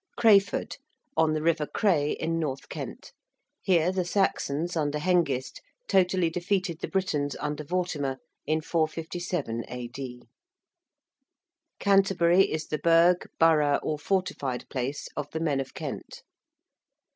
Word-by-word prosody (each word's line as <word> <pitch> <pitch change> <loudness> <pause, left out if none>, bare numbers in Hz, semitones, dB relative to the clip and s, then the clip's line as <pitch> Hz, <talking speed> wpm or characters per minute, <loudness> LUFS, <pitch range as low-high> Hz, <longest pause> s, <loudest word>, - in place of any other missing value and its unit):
~Crayford~: 200 -3 +3 0.4
on 160 -1 +3
the 155 0 -1
river 160 -2 +1
Cray 160 -9 +1
in 165 +1 -2
north 140 -4 -3
Kent. - - -7 0.5
Here 175 -2 +3
the 185 -1 0
Saxons 175 -3 0
under 150 -2 0
Hengist 150 -6 0 0.3
totally 185 -3 +3
defeated 180 -1 -1
the - - -3
Britons 150 -7 -1
under 150 +1 -3
Vortimer 150 -5 -2 0.3
in 155 0 +1
457 160 -5 -2
A.D. 125 0 -7 1.5
~Canterbury~ 195 -2 +4
is 155 0 -2
the 155 - -2
burgh, 170 +2 +4
borough, 150 -3 +4
or 150 -1 -2
fortified 150 -7 -2
place 135 +2 -3
of 145 -1 -4
the 160 - -4
men 150 -4 0
of 135 -1 -5
Kent. - - -7
160 Hz, 120 wpm, -27 LUFS, 145-180 Hz, 1.5 s, ~Canterbury~